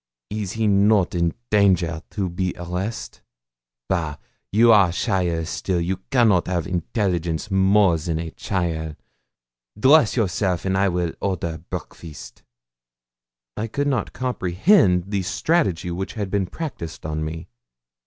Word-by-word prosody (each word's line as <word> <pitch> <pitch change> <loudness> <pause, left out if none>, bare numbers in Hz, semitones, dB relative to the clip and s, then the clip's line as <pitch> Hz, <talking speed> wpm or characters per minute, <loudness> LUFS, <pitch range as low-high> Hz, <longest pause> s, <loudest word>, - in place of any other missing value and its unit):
Is 105 -3 -3
he 110 0 -1
not 100 -1 +3
in 85 -1 0 0.2
danger 90 -6 +3
to 100 -3 -2
be 90 +1 -2
arrest? 90 +6 -5 0.7
Bah! 80 -6 -1 0.4
You 115 +3 +6
are 100 -5 +6
cheaile 85 -1 0
still; 90 +2 -2
you 90 +3 -1
cannot 110 -9 +3
have 90 -3 -1
intelligence 90 -1 -2
more 95 -2 +4
than 80 0 -2
a 80 0 -4
cheaile. 80 -5 -3 0.8
Dress 135 0 +5
yourself, 95 -4 0
and 95 0 +1
I 100 +1 +3
will 85 -2 -1
order 85 -4 -2
breakfast.' 80 -4 -8 1.1
I 110 - -3
could 140 +6 -2
not 130 -7 -1
comprehend 95 - +2
the 100 -2 0
strategy 95 - 0
which 95 +3 -4
had 100 -4 -3
been 100 -2 0
practised 105 - -6
on 80 0 -2
me. 80 +1 -5
95 Hz, 135 wpm, -22 LUFS, 85-105 Hz, 1.1 s, You